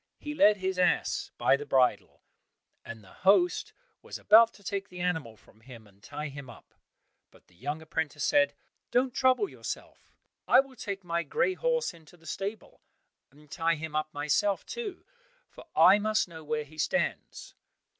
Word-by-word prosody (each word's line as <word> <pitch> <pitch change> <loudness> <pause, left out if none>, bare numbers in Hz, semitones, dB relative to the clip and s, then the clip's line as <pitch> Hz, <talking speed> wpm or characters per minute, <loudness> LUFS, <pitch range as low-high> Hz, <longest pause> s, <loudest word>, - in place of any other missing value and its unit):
He 295 - -6
led 215 -9 +5
his 190 -1 -3
ass 180 - +1
by - - +4
the 140 - -5
bridle, 130 -3 +1 0.6
and 115 -2 -9
the 95 - -17
host 355 - +2 0.3
was - - -8
about 225 +2 +6
to 200 - -18
take 200 +1 -4
the 180 - -10
animal 160 -11 -2
from 110 - -23
him 115 -2 -13
and 100 -1 -23
tie 150 +4 -6
him 140 -2 -10
up, 120 - -15 0.6
but - - -23
the - - -27
young 145 - -5
apprentice 160 -1 -3
said, 145 0 +3 0.3
"Don't 250 0 +1
trouble 260 +8 +2
yourself, - - -8 0.4
I - - +7
will 270 -1 -2
take 200 -4 -6
my 170 -1 -1
grey 170 - 0
horse 485 - -1
into 165 +1 -18
the 165 - -23
stable, 195 +5 -6 0.5
and 150 +1 -21
tie 165 -1 +1
him 155 0 -7
up 155 0 -1
myself 155 +8 0
too, 440 -6 -6 0.5
for - - -14
I 195 +3 +7
must 215 0 +1
know 160 -2 -11
where 150 0 -2
he 155 +2 -15
stands." 275 - -2
170 Hz, 175 wpm, -29 LUFS, 145-215 Hz, 0.6 s, I